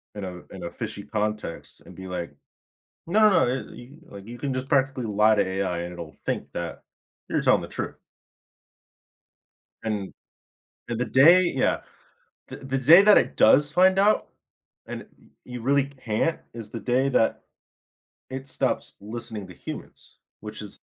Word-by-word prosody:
in 105 - -6
a 90 -2 -6
in 95 - -9
a 85 - -5
fishy 105 -3 -6
context 105 -4 -4
and - - -13
be, 95 0 -9
like, 85 -5 -5 0.7
"No, 215 +5 +5
no, 185 - +4
it" 130 +2 -2
y 120 - -12 0.2
like, 100 0 -11
you 120 +1 -8
can 135 +1 -3
just 130 +1 -4
practically 135 -2 +1
lie 105 +1 +3
to 105 - +2
AI 95 -2 -2
and 85 +1 -5
it'll 85 -3 -8
think - - -3
that 85 -1 -5 0.5
you're - - 0
telling - - +4
the - - -7
truth. - - -5 1.9
And 105 -3 -3 0.8
and 120 -1 -3
the 125 - 0
day 145 +10 +6
yeah. 130 - +1 0.7
The - - -8
the 135 0 -3
day 160 +9 +8
that 210 0 +7
it - - -1
does 145 +6 +5
find 185 +3 +4
out, 205 +2 +3 0.6
and - - -6
y - - -19 0.4
you 125 -2 -8
really 140 +2 +3
can't, 135 +2 -2
is 115 -3 -8
the 115 - -6
day 130 +3 +1
that 115 - +1 0.9
it 130 +1 -6
stops - - -1
listening 110 -1 -7
to 90 - -11
humans, - - -10 0.2
which 105 0 -8
is 105 - -8
115 Hz, 165 wpm, -25 LUFS, 100-135 Hz, 1.9 s, day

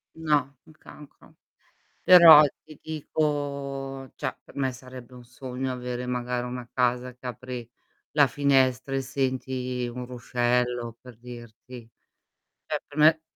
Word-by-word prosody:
no, 145 -4 0
un - - -18
cancro. 150 -1 -16 0.7
Però 170 -4 +10 0.2
ti 155 -2 -15
dico 140 -3 -3
cioè 130 -3 -4
per - - -18
me 135 -2 0
sarebbe 130 -1 -12
un 125 - -12
sogno 130 +1 -5
avere 125 0 -5
magari 125 0 -2
una 125 -1 -7
casa 125 0 0
che 125 - -18
apri 125 -1 -6 0.4
la 145 -2 +5
finestra 130 0 +1
e 135 - 0
senti 130 -1 -2
un 125 +1 -6
ruscello, 120 -1 -1
per 125 -2 -13
dirti. 120 0 -12 0.8
Cioè - - -2
per 145 - -13
me 155 +1 +5
130 Hz, 130 wpm, -26 LUFS, 125-140 Hz, 0.8 s, Però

